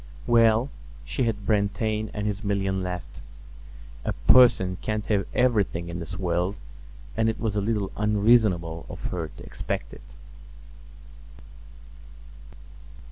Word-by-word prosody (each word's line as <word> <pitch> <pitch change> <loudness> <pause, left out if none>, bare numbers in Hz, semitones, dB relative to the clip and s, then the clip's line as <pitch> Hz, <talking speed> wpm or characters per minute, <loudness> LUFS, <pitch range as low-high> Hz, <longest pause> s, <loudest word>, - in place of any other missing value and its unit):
Well, 115 +2 +4 0.3
she 130 - -1
had 105 -3 -2
Brantain 105 +1 0
and 105 -1 -4
his 105 +1 -2
million 95 -2 0
left. 90 -1 -6 0.8
A - - -1
person 95 -8 +6
can't 110 -1 -2
have 100 -2 0
everything 105 -9 +1
in 85 0 -5
this 90 +2 -6
world; 90 +1 -1 0.6
and 110 0 +2
it 110 - -3
was 110 -3 -1
a 105 - +1
little 105 -2 -1
unreasonable 105 -6 +2
of - - -9
her 85 -3 -3
to - - -13
expect - - -5
it. - - -12
105 Hz, 125 wpm, -26 LUFS, 90-110 Hz, 0.8 s, person